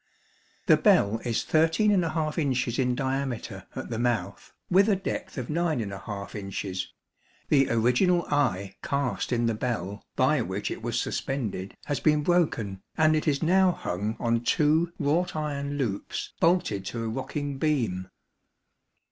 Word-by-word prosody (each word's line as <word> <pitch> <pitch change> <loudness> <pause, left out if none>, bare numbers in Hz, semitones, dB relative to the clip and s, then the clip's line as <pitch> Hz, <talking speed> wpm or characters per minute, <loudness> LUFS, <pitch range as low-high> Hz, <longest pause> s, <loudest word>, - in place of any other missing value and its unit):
The - - +6
bell 105 +3 +4
is 120 -2 0
13 165 +7 +3
inches 155 - 0
in 125 -1 +2
diameter 130 -7 -3
at 130 - -6
the 115 - -2
mouth, 115 -6 -1 0.2
with 195 +4 +4
a 205 - +4
depth 190 - -4
of 125 -3 -3
9 160 -2 0 0.5
inches; 95 -2 -4 0.6
the 135 -2 +4
original 125 +10 +3
eye 100 -10 0
cast 140 -3 -1
in 120 -1 +1
the 115 - +2
bell, 105 -4 -3
by - - +3
which - - -3
it - - -5
was - - -1
suspended, 110 -8 -3
has 145 - -1
been 150 -1 +3
broken, 120 - +1 0.2
and 155 0 +4
it 155 - -1
is 145 +1 +1
now 185 +2 +4
hung 105 - -3
on 115 -1 +1
two 155 +6 +2
wrought 165 +4 0
iron 145 -2 -2
loops 110 -8 -3
bolted 165 - +2
to 115 +3 -4
a - - -2
rocking 135 +4 -4
beam. 115 -12 0
135 Hz, 145 wpm, -27 LUFS, 115-155 Hz, 0.6 s, The